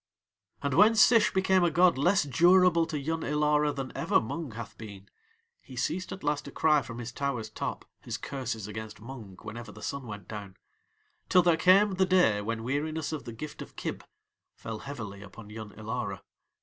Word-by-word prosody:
And 140 Hz, -2 st, 0 dB
when 215 Hz, -, +6 dB
Sish 220 Hz, -1 st, +6 dB
became 190 Hz, -1 st, +3 dB
a 175 Hz, -, +4 dB
god 175 Hz, +2 st, +4 dB
less 180 Hz, +8 st, +3 dB
durable 170 Hz, +3 st, +4 dB
to 155 Hz, -, -3 dB
Yun 160 Hz, +3 st, -2 dB
Ilara 150 Hz, 0 st, +2 dB
than 135 Hz, -2 st, -5 dB
ever -, -, +2 dB
Mung 130 Hz, +3 st, -5 dB
hath 115 Hz, -1 st, -8 dB
been 100 Hz, -3 st, -10 dB, 0.5 s
he 130 Hz, -, -12 dB
ceased 180 Hz, +9 st, -2 dB
at 190 Hz, -, -7 dB
last 145 Hz, 0 st, 0 dB
to -, -, -8 dB
cry 150 Hz, -2 st, +3 dB
from 115 Hz, -3 st, -8 dB
his 120 Hz, 0 st, -6 dB
tower's 125 Hz, -4 st, -3 dB
top -, -, -4 dB
his -, -, -5 dB
curses 125 Hz, -6 st, -4 dB
against 110 Hz, 0 st, -7 dB
Mung 110 Hz, -5 st, -10 dB
whenever 120 Hz, +1 st, -7 dB
the -, -, -12 dB
sun 140 Hz, -3 st, -4 dB
went 105 Hz, -4 st, -8 dB
down, 100 Hz, -3 st, -8 dB, 0.7 s
till 180 Hz, -, +6 dB
there 170 Hz, -1 st, +4 dB
came 190 Hz, +5 st, +5 dB
the 190 Hz, 0 st, +1 dB
day 180 Hz, -, +4 dB
when 115 Hz, +2 st, -3 dB
weariness 150 Hz, +4 st, -2 dB
of 150 Hz, -6 st, -5 dB
the 120 Hz, -, -6 dB
gift 140 Hz, +7 st, -8 dB
of -, -, -10 dB
Kib -, -, -5 dB, 0.5 s
fell 110 Hz, -1 st, -6 dB
heavily 110 Hz, -7 st, -7 dB
upon 105 Hz, +1 st, -12 dB
Yun 110 Hz, -1 st, -7 dB
Ilara. 110 Hz, -2 st, -4 dB
140 Hz, 190 wpm, -29 LUFS, 110-165 Hz, 0.7 s, when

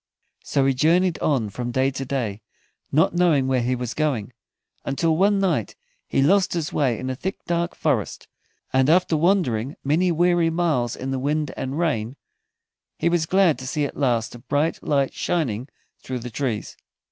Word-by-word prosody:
So 140 Hz, -2 st, +1 dB
he 135 Hz, -, +3 dB
journeyed 170 Hz, +6 st, +2 dB
on 125 Hz, -9 st, 0 dB
from 120 Hz, +3 st, -4 dB
day 130 Hz, +2 st, +1 dB
to 135 Hz, 0 st, -5 dB
day, 120 Hz, -6 st, -3 dB, 0.5 s
not 155 Hz, +4 st, +3 dB
knowing 170 Hz, -6 st, +3 dB
where 130 Hz, -1 st, +1 dB
he 125 Hz, +2 st, 0 dB
was 125 Hz, -1 st, -4 dB
going, 130 Hz, -8 st, -1 dB, 0.5 s
until 160 Hz, +4 st, 0 dB
one 200 Hz, +4 st, +3 dB
night 170 Hz, -, 0 dB, 0.3 s
he 135 Hz, -, +1 dB
lost 190 Hz, +5 st, +3 dB
his 165 Hz, -3 st, -3 dB
way 130 Hz, -6 st, +1 dB
in 130 Hz, +3 st, -4 dB
a -, -, -3 dB
thick 190 Hz, +9 st, -5 dB
dark 170 Hz, 0 st, -1 dB
forest, 135 Hz, -10 st, -1 dB, 0.5 s
and 130 Hz, +1 st, +3 dB
after 170 Hz, 0 st, +3 dB
wandering 155 Hz, -, +1 dB
many 165 Hz, +6 st, +2 dB
weary 175 Hz, 0 st, +3 dB
miles 160 Hz, -9 st, 0 dB
in 130 Hz, +1 st, -5 dB
the 135 Hz, -, -1 dB
wind 150 Hz, +2 st, -1 dB
and 135 Hz, +2 st, -4 dB
rain 135 Hz, -8 st, -1 dB, 0.8 s
he 170 Hz, -, +1 dB
was 170 Hz, -2 st, +1 dB
glad 185 Hz, -4 st, +3 dB
to 130 Hz, -, -7 dB
see 145 Hz, +1 st, 0 dB
at -, -, -6 dB
last 120 Hz, -5 st, 0 dB
a 120 Hz, -, -10 dB
bright 145 Hz, +6 st, -1 dB
light 140 Hz, -2 st, 0 dB
shining 130 Hz, -7 st, -2 dB, 0.3 s
through 130 Hz, -, -4 dB
the 125 Hz, 0 st, -7 dB
trees. 115 Hz, -5 st, -3 dB
140 Hz, 180 wpm, -23 LUFS, 125-170 Hz, 0.8 s, he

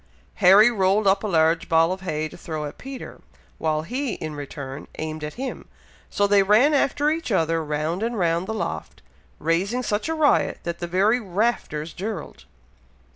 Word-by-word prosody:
Harry 205 Hz, +4 st, +7 dB
rolled 200 Hz, 0 st, +2 dB
up 195 Hz, +1 st, +3 dB
a -, -, -1 dB
large 165 Hz, -2 st, +2 dB
ball 165 Hz, +1 st, +4 dB
of 185 Hz, 0 st, -4 dB
hay 155 Hz, -4 st, -2 dB
to -, -, -13 dB
throw 155 Hz, -3 st, -5 dB
at 145 Hz, -, -8 dB
Peter, 265 Hz, 0 st, -9 dB, 0.4 s
while 155 Hz, -1 st, 0 dB
he, 250 Hz, -, -3 dB
in 155 Hz, -1 st, -6 dB
return, 140 Hz, -1 st, -7 dB
aimed 155 Hz, 0 st, -5 dB
at 150 Hz, -, -5 dB
him, 265 Hz, +2 st, -6 dB, 0.4 s
so 205 Hz, -, +1 dB
they 200 Hz, 0 st, +5 dB
ran 215 Hz, +10 st, +4 dB
after 290 Hz, +1 st, +2 dB
each 320 Hz, -5 st, -3 dB
other, 165 Hz, -3 st, +1 dB
round 155 Hz, +4 st, -2 dB
and 230 Hz, +1 st, -2 dB
round 170 Hz, 0 st, 0 dB
the -, -, -3 dB
loft, -, -, -5 dB, 0.3 s
raising 195 Hz, +10 st, 0 dB
such 210 Hz, +6 st, -1 dB
a 320 Hz, -, 0 dB
riot, 305 Hz, -2 st, +2 dB
that 170 Hz, 0 st, -4 dB
the 175 Hz, -, -4 dB
very 200 Hz, +7 st, +2 dB
"rafters 190 Hz, -7 st, -2 dB
dirled." 195 Hz, -4 st, -6 dB
185 Hz, 180 wpm, -23 LUFS, 160-220 Hz, 0.4 s, Harry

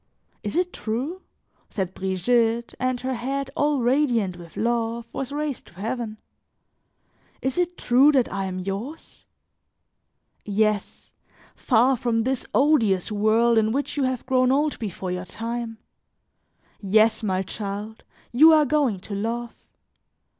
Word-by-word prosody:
"Is 210 Hz, -, -4 dB
it 360 Hz, +1 st, 0 dB
true?" 265 Hz, +12 st, -3 dB, 0.5 s
said 190 Hz, -3 st, -3 dB
Brigitte, 225 Hz, +5 st, 0 dB
and 255 Hz, -1 st, 0 dB
her 260 Hz, +1 st, -2 dB
head, 270 Hz, +3 st, -3 dB
all 290 Hz, -2 st, +1 dB
radiant 240 Hz, -7 st, +2 dB
with 170 Hz, -2 st, -13 dB
love, 230 Hz, 0 st, -1 dB
was 270 Hz, 0 st, -4 dB
raised 295 Hz, -2 st, -3 dB
to -, -, -17 dB
heaven; 220 Hz, +2 st, -4 dB, 1.2 s
"is 265 Hz, -1 st, -2 dB
it 355 Hz, 0 st, -1 dB
true 265 Hz, +5 st, +5 dB
that 260 Hz, -4 st, +3 dB
I 195 Hz, -1 st, -2 dB
am 185 Hz, -1 st, -4 dB
yours? 200 Hz, -, -6 dB, 1.2 s
Yes, 210 Hz, 0 st, -1 dB, 0.4 s
far 250 Hz, +2 st, +3 dB
from 235 Hz, -2 st, 0 dB
this 260 Hz, +1 st, -2 dB
odious 225 Hz, -, +3 dB
world 220 Hz, +2 st, +3 dB
in 220 Hz, 0 st, +1 dB
which 280 Hz, +4 st, -2 dB
you 290 Hz, -, -1 dB
have 255 Hz, -2 st, -1 dB
grown 255 Hz, -1 st, +3 dB
old 295 Hz, +2 st, +1 dB
before 190 Hz, -4 st, -4 dB
your 180 Hz, 0 st, -4 dB
time 230 Hz, +2 st, -5 dB, 1.0 s
yes, 215 Hz, +3 st, +3 dB
my 190 Hz, -3 st, 0 dB
child, 205 Hz, +3 st, -6 dB, 0.3 s
you 310 Hz, +7 st, +7 dB
are 305 Hz, -1 st, +5 dB
going 280 Hz, -8 st, +1 dB
to 205 Hz, -, -8 dB
love. 230 Hz, +4 st, -3 dB
235 Hz, 135 wpm, -24 LUFS, 210-265 Hz, 1.2 s, you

